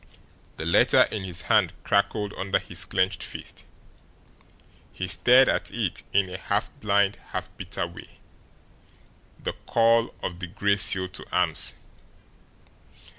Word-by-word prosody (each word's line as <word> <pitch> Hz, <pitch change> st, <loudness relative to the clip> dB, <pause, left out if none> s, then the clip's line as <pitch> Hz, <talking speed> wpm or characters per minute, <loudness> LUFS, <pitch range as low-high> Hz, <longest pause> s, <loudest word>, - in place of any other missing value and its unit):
The 80 Hz, -, -5 dB
letter 85 Hz, -, +5 dB
in 100 Hz, -3 st, -4 dB
his 90 Hz, -1 st, 0 dB
hand 105 Hz, -6 st, +2 dB
crackled 100 Hz, +1 st, 0 dB
under 95 Hz, 0 st, 0 dB
his -, -, 0 dB
clenched 95 Hz, -1 st, 0 dB
fist. -, -, -7 dB, 1.3 s
He 90 Hz, -, -5 dB
stared 125 Hz, +8 st, +5 dB
at -, -, 0 dB
it -, -, -3 dB
in 100 Hz, -1 st, +2 dB
a 90 Hz, +1 st, -7 dB
half -, -, -2 dB
blind, 100 Hz, -1 st, +1 dB
half 95 Hz, 0 st, -6 dB
bitter 90 Hz, -2 st, -4 dB
way. 85 Hz, 0 st, -13 dB, 1.2 s
The -, -, -4 dB
call 115 Hz, 0 st, +3 dB
of 90 Hz, -1 st, -4 dB
the 90 Hz, -, -5 dB
Gray 100 Hz, +2 st, 0 dB
Seal 95 Hz, -1 st, +4 dB
to 90 Hz, -, -6 dB
arms! 90 Hz, -3 st, +1 dB
95 Hz, 130 wpm, -25 LUFS, 90-100 Hz, 1.3 s, letter